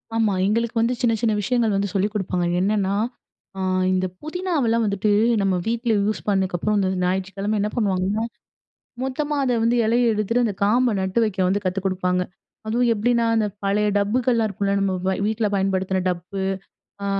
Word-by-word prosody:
ஆமா. 220 -3 +2
எங்களுக்கு 230 +2 0
வந்து 240 +2 +1
சின்ன, 235 -2 +3
சின்ன 225 -2 +2
விஷயங்கள் 225 -1 +1
வந்து 195 -1 -1
சொல்லிக் 200 +2 0
குடுப்பாங்க. 185 -4 -1 0.2
என்னன்னா, 200 0 +1 0.6
அ - - -5 0.3
இந்த 185 0 +1 0.2
புதினாவெல்லாம் 310 -9 0
வந்துட்டு 200 +1 0 0.3
நம்ப 195 -1 +1
வீட்டுல 230 0 0
யூஸ் 215 +1 -1
பண்ணதுக்கு 190 -3 +1
அப்புறம், 210 +4 0
இந்த 190 -1 +1
ஞாயிற்றுக்கிழமை 195 +3 -1
என்ன 210 - 0
பண்ணுவாங்கன்னா, 200 -1 0 0.8
மொத்தமா 290 +3 -2
அத 245 -2 +1
வந்து 235 +1 +2
இலைய 235 +1 +3
எடுத்துட்டு 225 +4 +1
அந்த 210 - -1
காம்ப 235 +3 +3
நட்டு 190 +4 0
வைக்க 205 -3 -4
வந்து 200 +2 0
கத்து 185 +1 -1
குடுப்பாங்க. 180 -1 0 0.5
அதுவும் 240 +2 +2
எப்படின்னா, 235 +2 +1
அந்த 220 -1 +2 0.2
பழைய 205 +1 +2
டப்புகள்லாம் 230 +2 +1
இருக்கும்ல 200 0 -1
நம்ப 195 -1 +1
வ - - +3 0.2
வீட்டுல 220 0 0
பயன்படுத்துன 190 -1 0
டப்பு, 180 +2 -4 0.6
அ - - -2
210 Hz, 165 wpm, -22 LUFS, 195-230 Hz, 0.8 s, சின்ன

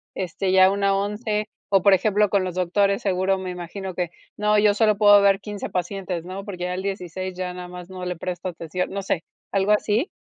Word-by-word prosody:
este, 185 +1 -2
ya 190 0 +7
una 200 0 +1
11". 210 +1 -1 0.3
O, 195 - +6
por 200 +1 +6
ejemplo, 205 +2 +3
con 195 -1 +2
los 180 -1 -4
doctores, 195 +2 +1
seguro 190 0 +1
me 185 -1 -5
imagino 180 +2 -6
que, 175 -2 -2 0.3
no 210 0 +3
yo 205 -1 +4
solo 215 -1 +3
puedo 205 -1 +7
ver 195 -1 +4
15, 205 -1 -6
pacientes, 180 -1 -3
¿no?, 190 +2 -6
porque 180 -3 -5
ya 180 - -2
el 190 - -4
16, 185 -1 -4
ya 180 -1 -3
nada 180 0 -7
más 180 0 -9
no 185 -1 -7
le 180 0 -2
presto 180 +2 -4
atención, 170 +2 -4
no 200 +1 -3
sé, 180 -3 -2 0.3
¿algo 195 +1 +2
así? 215 - +1
190 Hz, 215 wpm, -23 LUFS, 180-205 Hz, 0.3 s, ya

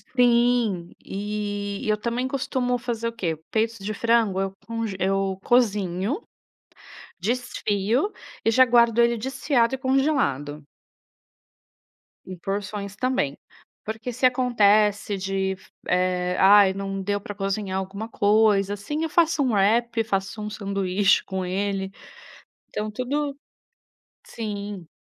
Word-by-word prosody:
Sim. 235 -7 +3
E 205 0 -4
e - - 0
eu 210 - +2
também 235 +4 -2
costumo 255 -2 -1
fazer 235 -1 -3
o 230 - -4
quê? 170 -8 -2
Peitos 225 +1 0
de 205 +2 -4
frango, 225 -3 +2
eu 195 0 -2
conge 230 -3 -3
eu 195 0 0
cozinho, 210 - +1 1.0
desfio, 230 - 0 0.3
e 225 - +4
já 260 +3 +7
guardo 235 -1 +4
ele 235 0 +4
desfiado 260 0 +1
e - - -7
congelado. 255 - 0 1.6
Em 185 -1 -8
porções 200 +2 -4
também. 230 - -1 0.5
Porque 220 +3 -4
se 255 +2 0
acontece 215 -5 +3
de, 190 0 -1 0.3
eh, 180 0 +1
"Ai 195 0 +7
não 195 0 -4
deu 205 +1 -1
pra 205 - -7
cozinhar 195 -1 -2
alguma 200 +4 -6
coisa 205 -2 +3
assim" 295 +11 -3
eu 325 - -1
faço 320 -2 +3
um 250 -4 +1
wrap, 225 +3 +2
faço 195 0 -2
um 210 - -4
sanduíche 195 -1 +1
com 190 -1 -4
ele, 195 +1 -2 0.8
então 215 0 -3
tudo 275 +5 -2 0.9
sim. 205 -5 -6
210 Hz, 125 wpm, -24 LUFS, 195-235 Hz, 1.6 s, já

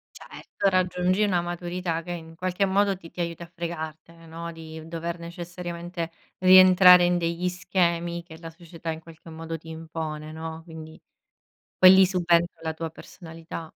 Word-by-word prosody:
Certo, 200 - -4
raggiungi 185 +1 +1
una 185 -4 +2
maturità 175 -1 -3
che 175 - -10
in 165 -1 -8
qualche 185 +3 -1
modo 195 0 +2
ti 165 -3 -13
ti 180 - -9
aiuta 170 0 -3
a - - -12
fregartene, 165 -1 -7
no, 165 +1 -7
di 160 -1 -10
dover 170 +1 -4
necessariamente 170 0 -6 0.3
rientrare 185 -1 +8
in 175 0 +2
degli 170 +1 -1
schemi 170 -1 -1
che 160 -2 -13
la 165 -1 -9
società 165 0 -8
in 160 0 -5
qualche 165 0 -14
modo 165 0 -6
ti 160 - -15
impone, 160 -1 -6
no, 160 0 -7
quindi, 160 -1 -11 0.8
poi 185 0 +9
lì 190 0 +7
subentra 175 -2 +1
la 160 -1 -3
tua 165 0 -5
personalità. 165 0 -10
170 Hz, 160 wpm, -25 LUFS, 165-180 Hz, 0.8 s, poi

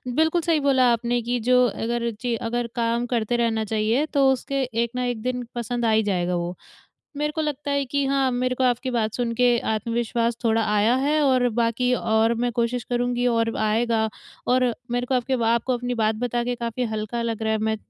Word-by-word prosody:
बिल्कुल 320 +3 +2
सही 330 -2 +2
बोला 265 -3 +3
आपने 240 +1 0
कि 245 +2 -1
जो 250 0 +6
अगर 235 +2 -2
जी 245 -2 0
अगर 235 +1 -2
काम 235 0 0
करते 235 -1 0
रहना 225 -2 +1
चाहिए 220 +6 +1
तो 280 -3 +2
उसके 275 +1 -1
एक 235 -2 -1
न - - -2
एक 245 -3 -2
दिन 250 +1 -2
पसंद 240 0 -2
आ 225 - +3
ही 220 0 +3
जाएगा। 180 -3 0
वो 175 +1 -3 0.6
मेरे 300 +1 -1
को 315 - -3
लगता 295 -2 -3
है 280 0 +1
कि 280 +2 -1
हाँ 270 -1 +2
मेरे 255 +1 0
को 260 - 0
आपकी 250 +1 +1
बात 220 -3 0
सुन 240 -2 -1
के 245 0 +3
आत्मविश्वास 230 +1 -1
थोड़ा 225 0 +3
आया 210 +3 +3
है 290 +4 +1
और 255 -3 +3
बाकी 235 +2 0
और 220 -1 +2
मैं 245 - +1
कोशिश 235 0 -1
करुँगी 245 0 0
और 230 -1 +1
आएगा 220 +1 +1 0.4
और 250 -1 +3 0.2
मेरे 245 +1 -1
को 260 - 0
आपके 255 +1 0
बा 230 -2 0
आपको 235 +2 0
अपनी 245 +1 -3
बात 220 -1 +1
बता 240 +1 -2
के 245 0 -1
काफ़ी 235 +1 -3
हल्का 215 +2 -3
लग 230 -1 -3
रहा 220 0 +1
है, 220 - +1
मैं 220 0 0
240 Hz, 215 wpm, -24 LUFS, 225-255 Hz, 0.6 s, जो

